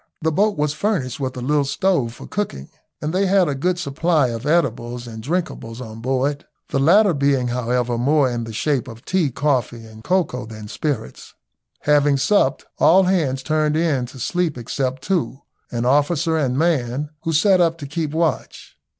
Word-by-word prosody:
The 160 - +2
boat 205 +5 +1
was 150 0 0
furnished 150 - -1
with 130 -1 -3
a - - -4
little 145 +3 +2
stove 140 -4 0
for - - -10
cooking, 190 - -4 0.3
and 155 +2 -2
they 195 +1 +2
had 190 -2 +4
a 145 - 0
good 175 +6 0
supply 155 -3 +1
of 115 +4 -5
eatables 125 -6 0
and 110 -2 -8
drinkables 130 -6 -3
on 115 -2 -8
board, 135 +3 -1 0.3
the 135 - 0
latter 185 +7 +5
being, 140 -3 +1
however, 120 0 -1
more 140 +2 +3
in 120 -2 -3
the 115 - -7
shape 135 +3 -1
of 115 -1 -11
tea, 185 -6 +1
coffee, 125 -4 -1
and 110 0 -13
cocoa, 160 -10 0
than 110 -1 -9
spirits. 145 - -4 0.5
Having 145 -1 +3
supped, 145 -1 +2
all 190 +3 +6
hands 155 -9 0
turned 155 +1 +1
in 150 -7 +1
to 130 - -12
sleep 170 +2 -1
except 130 +2 -3
two, 145 -9 -1 0.3
an 120 0 -2
officer 150 +5 +2
and 135 -5 0
man, 145 -3 0
who 165 - -2
sat 185 +4 +4
up 165 -1 +2
to 150 - -7
keep 150 +1 -3
watch. 160 -3 -2
140 Hz, 180 wpm, -21 LUFS, 125-165 Hz, 0.5 s, all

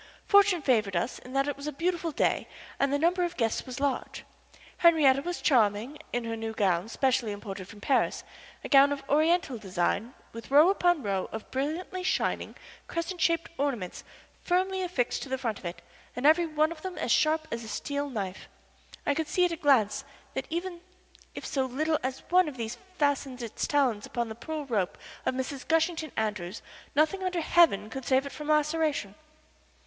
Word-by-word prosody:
Fortune 400 -5 +5
favored 215 -8 +2
us 175 +9 -1
in 255 - -12
that 275 +1 +2
it 290 - -1
was 280 +1 -7
a - - -1
beautiful 340 +3 -1
day - - +1 0.3
and 275 0 +2
the 285 - +2
number 345 +4 +2
of 350 0 -3
guests 230 0 0
was 255 +1 -6
large. 280 -2 -2 0.5
Henriette 295 -6 +5
was 350 +1 -4
charming 235 +1 +2
in 245 0 -1
her 230 0 -3
new 225 0 -4
gown 190 -2 +1
specially 255 -2 +1
imported 200 -2 -7
from 205 0 -13
Paris 270 - +1 0.4
a - - -4
gown 280 0 +7
of 275 -1 -4
Oriental 310 -4 +2
design 200 +4 -1 0.2
with 230 0 -9
row 300 +7 +7
upon 350 -6 +2
row 195 -2 -1
of 220 -1 -7
brilliantly 320 +8 -3
shining, 365 - -1 0.3
crescent 335 +1 -4
shaped 335 -1 +1
ornaments 245 -11 -2 0.4
firmly 375 +1 +1
affixed 345 -10 -1
to 275 - -6
the 265 - -1
front 230 -5 -3
of - - -14
it 170 +1 -6 0.3
and 250 - -3
every 325 +3 +5
one 310 0 +1
of 325 -2 -8
them 370 0 -6
as - - -1
sharp 310 0 +3
as 230 0 -3
a - - -8
steel 285 +6 -3
knife. 195 -7 -5 0.6
I 285 - +3
could 315 +1 -2
see 360 +4 +3
at 350 - 0
a - - -1
glance 270 - +3 0.3
that 265 - -3
even 345 +1 -4 0.5
if - - -6
so 265 -2 0
little 310 +5 0
as 260 +1 -4
one 365 -1 +5
of 285 -4 -6
these 225 -1 -4 0.2
fastened 275 -4 0
its 225 - -3
talons 255 -8 +1
upon 235 -1 -2
the - - -5
pearl 295 +6 -5
rope 210 -8 -1 0.3
of - - +1
Mrs. 260 +1 -4
Gushington 325 -1 +1
Andrews 210 -3 -2 0.3
nothing 315 +6 +2
under 365 -2 -1
heaven 305 - +4
could 265 0 -6
save 265 +1 +3
it 280 - -6
from 300 -1 -8
laceration. 300 -7 +1
280 Hz, 190 wpm, -28 LUFS, 230-325 Hz, 0.6 s, gown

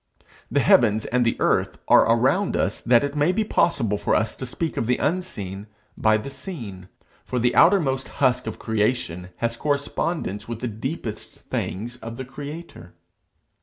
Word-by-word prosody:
The - - +2
heavens 110 -2 +4
and 125 0 +1
the 115 - +1
earth - - +1
are - - +6
around 135 - +2
us 100 - 0
that 120 0 +4
it 140 +1 -3
may 150 +4 +3
be 220 +4 +1
possible 130 - +1
for - - +1
us 110 +1 0
to 130 - -5
speak 160 +5 -3
of 115 - -1
the 125 - +2
unseen 110 - -3 0.3
by 110 0 +3
the 125 +6 -6
seen; 120 - -7 0.4
for 125 - -4
the 120 0 +2
outermost 155 -8 +4
husk 125 -2 +2
of - - -4
creation 105 -5 -1
has 115 +3 -1
correspondence 145 - -2
with 115 -1 -5
the 125 - -3
deepest 115 +1 -6
things 115 +5 -3
of 115 -1 -8
the 130 - -5
Creator. 140 - -9
125 Hz, 165 wpm, -24 LUFS, 110-145 Hz, 0.4 s, are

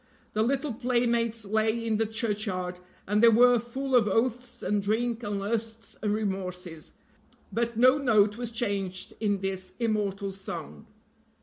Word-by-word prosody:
The 215 - +1
little 270 +3 0
playmates 235 -2 +1
lay 220 +2 +1
in 220 -2 +1
the 225 0 +1
churchyard, 210 -5 -2 0.3
and 210 +2 +2
they 235 - +8
were 245 +2 +6
full 260 +3 -2
of 230 -4 +5
oaths 240 +4 -1
and 205 0 +1
drink 225 +3 0
and 205 -3 -2
lusts 225 +2 -3
and 210 - 0
remorses 180 -6 -3 0.6
but 235 +1 -1
no 255 +4 +6
note 215 -6 +4
was 240 0 -3
changed 200 -5 -2
in 205 -3 0
this 190 -1 -3
immortal 205 -4 -1
song. 75 - -8
220 Hz, 145 wpm, -28 LUFS, 200-235 Hz, 0.6 s, they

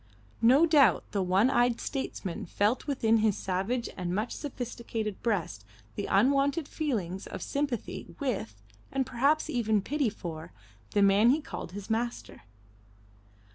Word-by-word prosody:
No 260 +8 +6
doubt 300 -5 +5
the 200 - 0
one 190 +7 +3
eyed 240 -2 +2
statesman 200 -11 -4
felt 210 - 0
within 230 -5 +2
his 215 -2 +2
savage 195 +7 -1
and 180 -1 -3
much 215 +4 -1
sophisticated 235 -6 -5
breast 170 - -1 0.3
the - - -4
unwonted 275 +8 +2
feelings 200 - -3
of - - -6
sympathy 280 -5 -3
with, 190 - -3 0.3
and 270 -1 0
perhaps 275 +5 +1
even 220 -4 +1
pity 285 -1 0
for, 165 - -8 0.4
the 205 - +5
man 200 +4 +5
he 285 +5 +4
called 235 - -7
his 200 0 -7
master. 235 +2 -3
230 Hz, 135 wpm, -29 LUFS, 195-265 Hz, 0.4 s, No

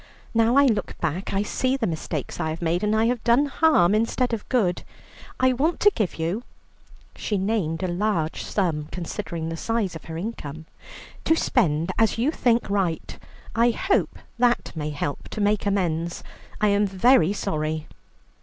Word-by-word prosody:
Now 230 +2 +3
I 280 0 +6
look 220 -6 0
back, 170 +3 -2
I 195 +1 +1
see 255 +5 0
the 245 - -1
mistakes 155 - -4
I 160 - -1
have 160 +1 -4
made, 170 +2 0
and 210 +1 +2
I 220 +1 +3
have 245 0 0
done 240 +5 +4
harm 280 - +3
instead 230 +3 +1
of 220 - -4
good. 195 -9 +1 0.6
I 255 0 +4
want 305 +7 0
to 415 - +6
give 210 -7 -1
you" 170 +7 -2 0.7
she 210 - -2
named 190 -4 -1
a - - +1
large 175 -3 -1
sum 160 -7 -1
considering 170 -2 -4
the 165 - -3
size 220 -3 -1
of 160 - -9
her 160 0 -6
income 160 -6 -6 0.6
"to 320 - +4
spend 170 - +1
as 225 0 +3
you 250 +7 +2
think 240 -6 +1
right, 195 -5 -1 0.4
I 235 +1 +4
hope 385 - 0 0.2
that 240 -6 +1
may 150 -1 -3
help 145 -1 -4
to - - -6
make 205 0 +1
amends. 170 -4 -1 0.4
I 210 - +3
am 200 0 +3
very 195 -1 +4
sorry." 155 -6 -2
200 Hz, 175 wpm, -24 LUFS, 165-230 Hz, 0.7 s, I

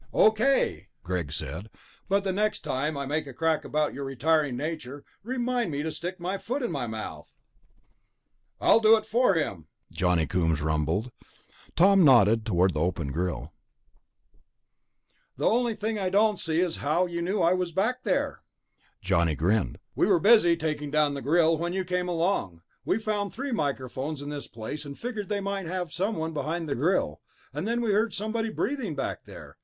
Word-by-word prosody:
"Okay," 220 +6 +3 0.2
Greg 85 -5 -3
said, 80 +8 -5 0.4
"but 200 +1 +2
the 195 - 0
next 210 +3 0
time 150 -1 -2
I 140 - -3
make 150 +2 -2
a 135 - -9
crack 160 +2 +1
about 150 0 0
your 140 - -5
retiring 140 0 +1
nature, 145 -2 -5 0.2
remind 245 -1 -1
me 145 -1 -2
to 160 - -2
stick 180 +4 -5
my 185 +3 -3
foot 255 +6 -3
in 240 - -1
my 125 -4 -2
mouth." 105 -9 -7 1.3
"I'll - - +5
do 220 0 +7
it 215 - -5
for 225 -2 +3
him," 95 - -2 0.3
Johnny 90 -3 +2
Coombs 80 -4 +1
rumbled. 80 +9 -1 0.6
Tom 195 +2 +6
nodded 115 -5 +5
toward 90 -2 +3
the 75 - -2
open 80 -4 -1
grill. 85 +3 -3 1.8
"The - - -2
only 235 0 +2
thing 215 +1 -2
I 190 -2 0
don't 210 +1 +3
see 165 +1 0
is 180 -3 -1
how 155 +5 +1
you 170 -1 -4
knew 190 +4 -1
I 170 +1 +4
was 180 -2 -1
back 220 +9 0
there." 200 -6 -1 0.6
Johnny 85 -4 +2
grinned. 95 +6 +1 0.2
"We - - +2
were - - +4
busy 195 -4 +5
taking 150 -2 -2
down 150 0 +2
the 140 - -4
grill 160 +2 +3
when 175 +1 -2
you 190 0 -1
came 180 0 -1
along. 165 - -1 0.2
We'd 220 - 0
found 205 -2 -1
three 275 +2 -4
microphones 140 - -3
in 145 - -6
this 145 -1 -5
place, 115 +7 -6
and 140 -1 -8
figured 220 -4 -5
they 205 -1 -1
might 195 -2 -3
have 180 -2 -3
one 170 -5 -1
behind 160 +2 -3
the 140 - -1
grill. 140 - 0 0.3
And 150 +8 -3
then 235 +1 0
we 230 -3 +1
heard 215 +2 +1
somebody 225 +2 -2
breathing 225 - -2
back 135 - -4
there - - -12
160 Hz, 180 wpm, -27 LUFS, 130-200 Hz, 1.8 s, do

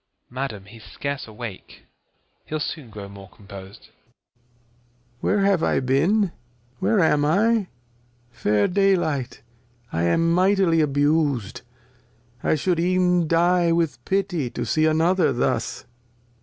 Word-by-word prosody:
Phys. - - -46
Madam 125 -7 -5
he's 110 +2 -14
scarce 140 -2 -5
awake; 110 -2 -9 0.6
he'U 155 - -3
soon 150 -3 -5
grow 100 -2 -9
more 100 -1 -12
compos'd. 100 0 -13 1.3
Lear. - - +1
Where 200 -1 +2
have 195 -4 +2
I - - +1
been? 165 +10 +2 0.5
Where 220 - +2
am 150 -3 +3
I? 205 +6 +2 0.6
Fair 105 -3 +1
Day 195 +1 +3
Light! 140 -10 -3 0.5
I 80 - 0
am 165 - +2
mightily 185 -2 +3
abus'd, 145 -6 0 0.8
I - - +2
shou'd 170 +3 0
even 180 -1 +2
die 170 +1 +3
with 160 -7 -1
Pity 190 -8 -1
To 120 0 -4
see 155 +6 +2
another 160 0 +2
thus. 120 - -2
155 Hz, 130 wpm, -23 LUFS, 120-180 Hz, 1.3 s, am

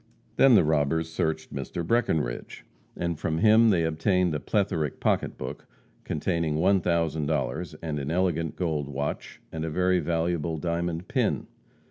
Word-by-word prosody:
Then 135 -3 +7
the - - +6
robbers 80 +1 +1
searched 80 -1 -2
Mr. 70 +5 -4
Breckenridge, 80 - -1 0.3
and 85 -2 -2
from 80 -1 -1
him 110 +3 +6
they 90 -5 +3
obtained 85 +2 +1
a 75 - -1
plethoric 90 -7 -1
pocketbook, 65 - -2 0.4
containing 80 -1 -1
one 95 +4 +3
thousand 80 -3 0
dollars, 80 +2 -2
and 75 -3 -2
an 70 0 -4
elegant 85 -2 0
gold 80 -6 -1
watch, 70 +1 -4
and 80 -1 -4
a 80 - -2
very 90 +3 +2
valuable 85 0 -1
diamond 85 +1 -2
pin. - - 0
80 Hz, 145 wpm, -27 LUFS, 75-90 Hz, 0.4 s, Then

